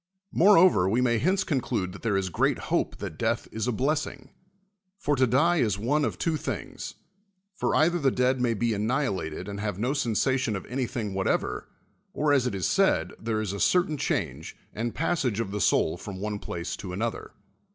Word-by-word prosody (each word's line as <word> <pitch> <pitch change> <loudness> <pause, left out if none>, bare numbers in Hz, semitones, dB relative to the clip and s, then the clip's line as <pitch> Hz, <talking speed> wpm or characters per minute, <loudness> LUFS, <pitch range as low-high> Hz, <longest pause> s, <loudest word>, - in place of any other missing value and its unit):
]\Ioreover, 180 - +6
we 115 +5 +2
may 120 -2 +2
hence 185 - +2
conclude 120 - -1
that 100 - -11
there 105 -4 +1
is 95 -1 -1
great - - +2 0.2
hope - - +1
that - - -7
death - - 0
is 110 +1 -3
a - - +2
blessing. 135 +1 -2 0.7
For 145 -6 0
to 130 -1 +3
die 160 +9 +3
is 105 -9 +1
one 145 +8 +1
of - - -3
two 165 -2 0
things: - - -5 0.6
for 210 - -1
either 170 +3 +3
the 140 -3 +3
dead 125 0 +1
may 120 -2 +2
be 115 +2 0
annihilated 105 - -1
and 100 0 -5
have 105 -3 -3
no 120 +6 0
sensation 125 -2 +1
of 95 - -5
any 125 0 -2
thing 105 -5 -4
whatever; 95 0 -1 0.5
or, 150 -1 +2
as 130 -3 +3
it 120 - -2
is 95 - -2
said, - - +2
there 110 -1 -1
is 100 -3 -3
a 100 - -4
cer 180 - +4
tain 155 - -4
change 80 - -2 0.2
and 115 +2 -3
passage 140 - 0
of 110 -4 -2
the 105 - -3
sonl 85 -2 +2
from 100 -2 -7
one; 105 +1 -3
plac" 85 -3 -4
to 95 -2 -7
another. 115 +5 -3
120 Hz, 200 wpm, -27 LUFS, 100-140 Hz, 0.7 s, Ioreover